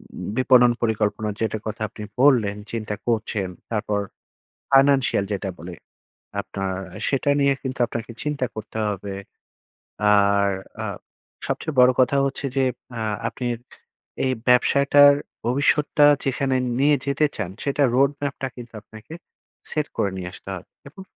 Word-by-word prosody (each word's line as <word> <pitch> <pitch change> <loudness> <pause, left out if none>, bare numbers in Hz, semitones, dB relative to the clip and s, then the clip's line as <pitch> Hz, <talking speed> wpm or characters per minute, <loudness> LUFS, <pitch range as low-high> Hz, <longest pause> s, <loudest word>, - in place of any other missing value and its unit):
উম - - -6
বিপণন 125 -2 +5
পরিকল্পনা 110 -1 0
যেটার 110 -1 -2
কথা 110 +1 -5
আপনি 105 0 -9 0.2
বললেন 115 -8 +4 0.2
চিন্তা 110 -2 -3
করছেন 110 -4 -1 0.2
তারপর, 105 -1 -1 0.7
financial 135 -6 +4
যেটা 100 0 -3
বলে, 85 +1 -8 0.7
আপনার 95 -1 -4 0.3
সেটা 140 +1 0
নিয়ে 140 0 +4
কিন্তু 130 -2 -5
আপনাকে 115 +1 -6
চিন্তা 150 -3 -1
করতে 110 0 -7
হবে। 100 -1 -4 1.0
আর 100 0 +3 0.3
আ - - -2 0.6
সবচেয়ে 155 -3 -3
বড়ো 125 0 +7
কথা 130 +2 +3
হচ্ছে 140 0 -3
যে 135 - +3 0.3
আ - - -3 0.3
আপনার 120 +1 -3 0.7
এই 130 - +1 0.2
ব্যবসাটার 140 +3 +6 0.3
ভবিষ্যৎটা 145 +3 +3 0.2
যেখানে 135 0 0 0.2
নিয়ে 145 +2 +4
যেতে 140 +2 +1
চান 100 -4 -3
সেটার 140 -1 +2
roadmap 140 +1 +1
টা 135 - -1
কিন্তু 120 -1 -10
আপনাকে, 110 +7 -12 0.6
সেট 150 -1 -1
করে 100 - +1
নিয়ে 90 -1 -5
আসতে 100 - -11
হবে 90 - -10 0.2
এবং, 175 +7 -12
125 Hz, 135 wpm, -23 LUFS, 105-140 Hz, 1.0 s, বড়ো